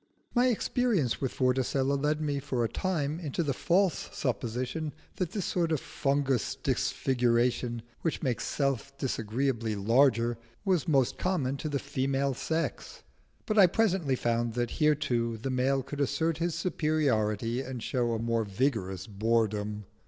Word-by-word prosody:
My 245 +1 +4
experience 230 - +1
with 135 - 0
Vorticella 130 +1 +1
led 150 +2 0
me 145 -2 0
for 130 -4 -1
a - - +2
time 160 -1 -1
into 165 0 -2
the 140 -3 0
false 180 +7 +1
supposition 125 +5 -2 0.2
that 180 -3 -1
this 200 -4 -2
sort 170 -2 0
of 155 - +2
fungous 140 -5 0
disfiguration, 120 -1 +1 0.2
which 165 - -2
makes 125 -6 -1
Self 140 -1 -1
disagreeably 115 -2 -1
larger, 115 +2 +3 0.3
was 185 -6 +2
most 135 -6 +2
common 150 -8 0
to 155 - -4
the 145 - 0
female 135 0 -1
sex; 160 +6 -3 0.4
but 215 -2 +2
I 190 - +9
presently 185 -8 +1
found 120 -1 0
that 120 -1 -1
here 150 0 +5
too 120 -6 -1
the 130 +5 -3
male 130 +1 +1
could 145 +2 -5
assert 160 +4 0
his 170 -1 0
superiority 130 - 0
and 130 -3 -6
show 120 -3 0
a - - 0
more 115 0 0
vigorous 100 -4 -1
boredom. 105 -1 0
135 Hz, 150 wpm, -29 LUFS, 115-155 Hz, 0.4 s, I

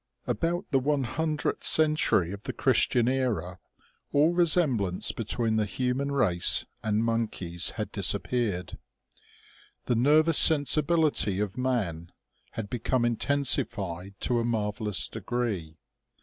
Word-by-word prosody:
ABOUT 165 - -2
the 135 - +3
one 140 +1 0
hundredth 155 +5 -3
century 155 - +3
of 100 0 -8
the - - -6
Christian 120 -1 +1
era 115 -10 -2 0.5
all 150 +4 +3
resemblance 150 - +2
between 115 0 -2
the 105 -1 0
hu 125 +4 -2
man 140 +2 -3
race 100 -11 +2 0.2
and 110 +1 0
monkeys 105 -7 -1
had - - -4
disappeared. 105 -8 -2 1.1
The 125 - 0
nervous 150 +6 +5
sensibility 150 - +3
of 105 -2 -3
man 105 -11 -3 0.4
had 110 -2 -5
become 120 +2 -1
intensified 100 -8 -1
to 120 -1 0
a - - -1
marvellous 105 -6 -1
degree. 100 -11 -4
120 Hz, 120 wpm, -27 LUFS, 100-140 Hz, 1.1 s, nervous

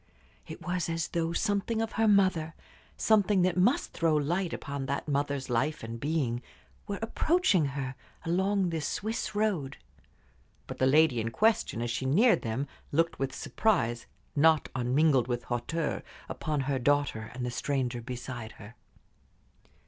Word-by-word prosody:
It - - -9
was 180 -1 -1
as 165 0 -2
though 165 -1 -1
something 205 +4 0
of 225 0 -1
her 225 0 +1
mother, 185 -6 +3 0.4
something 205 -3 +3
that 185 -1 +2
must 195 +9 +2
throw 165 -2 +2
light 170 +5 0
upon 140 -2 -4
that 140 +2 -2
mother's 140 -1 -1
life 135 +5 0
and 115 +1 -6
being, 140 -4 -1 0.5
were 200 - -3
approaching 225 - +2
her 135 -1 -3 0.3
along 190 +2 +1
this 160 -3 -2
Swiss 220 0 -3
road. 190 -11 0 0.9
But - - -8
the 130 - +4
lady 145 -4 +4
in 115 - -2
question, 210 - +1
as 120 - -2
she 130 +3 -2
neared 215 - +4
them, 120 +5 -2 0.2
looked 165 +2 +1
with 135 -1 -1
surprise, 120 - 0 0.3
not 155 +1 +4
unmingled 130 0 +2
with 120 -1 -2
hauteur, 145 +7 -2 0.3
upon 150 -2 -2
her 135 0 -1
daughter 140 -5 +1
and 125 -1 -3
the 125 - -2
stranger 125 -2 -1
beside 120 -2 -6
her. 100 +3 -12
150 Hz, 150 wpm, -29 LUFS, 130-185 Hz, 0.9 s, the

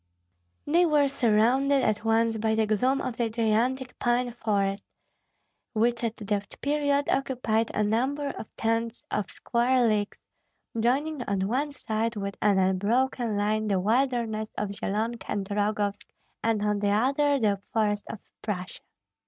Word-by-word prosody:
They 335 +4 +4
were 295 -2 +4
surrounded 265 +2 +3
at 215 0 0
once 225 0 +2
by 220 0 +1
the 220 0 +2
gloom 250 +6 +1
of 240 -2 -4
the 235 -2 0
gigantic 235 +3 0
pine 245 0 +1
forest, 200 -4 -1 0.9
which 235 +2 +1
at 230 0 -2
that 205 -2 -3
period 285 0 +1
occupied 245 -4 0
a 210 - +2
number 265 +7 0
of 220 - -7
tens 230 +1 -1
of 210 - -1
square 245 +1 +1
leagues, 210 -2 0 0.6
joining 275 +5 +1
on 200 -1 -1
one 275 +7 0
side 225 -3 -2
with 200 -1 -4
an 205 -2 +3
unbroken 215 +5 +1
line 215 +1 0
the 195 -2 +1
wilderness 225 0 0
of 210 - -1
Zyelonka 220 +4 -3
and 195 -2 -2
Rogovsk, 205 0 -1 0.4
and 225 -2 +1
on 210 -1 +1
the 205 0 +1
other 275 +7 +2
the 205 -4 +1
forests 210 -2 0
of - - -5 0.2
Prussia. 185 -4 -5
225 Hz, 145 wpm, -27 LUFS, 210-255 Hz, 0.9 s, They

